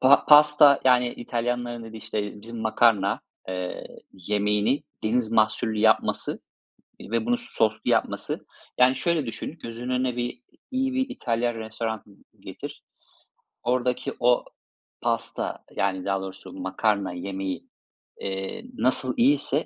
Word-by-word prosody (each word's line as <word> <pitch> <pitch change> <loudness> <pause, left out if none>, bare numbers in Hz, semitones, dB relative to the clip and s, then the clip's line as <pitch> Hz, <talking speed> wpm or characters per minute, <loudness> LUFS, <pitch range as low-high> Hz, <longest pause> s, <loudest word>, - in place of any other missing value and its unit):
pa 135 +2 +6
pasta 150 -1 +8
yani, 125 -1 +5
İtalyanların 120 0 -3
dediği 110 0 -9
işte 105 -2 -4
bizim 115 +1 -7
makarna, 110 -3 +3 0.3
eee, 90 -1 -4 0.3
yemeğini 105 +6 +1 0.2
deniz 115 0 +1
mahsullü 110 0 +2
yapması, 110 0 +2 0.6
ııı, - - -11
ve 115 - +1
bunu 245 0 +2
soslu 110 - -1
yapması. - - -1 0.3
Yani, 125 +1 +6
şöyle 170 -3 +1
düşün, 120 +7 -6
gözünün 115 +2 -6
önüne 125 -1 0
bir 120 - -3 0.3
iyi 265 0 0
bir 260 +1 0
İtalyan 120 - -1
restoranı 110 0 -4 0.4
getir. - - -9 0.8
Oradaki 125 0 0
o 120 0 +3 0.6
pasta - - -2
yani, 95 -1 0
daha 95 -1 0
doğrusu 95 0 -8
makarna 100 -4 0
yemeği, 95 +1 -4 0.6
eee, 95 - -4
nasıl 130 0 +1
iyiyse 140 +3 +3
115 Hz, 120 wpm, -25 LUFS, 105-130 Hz, 0.8 s, pasta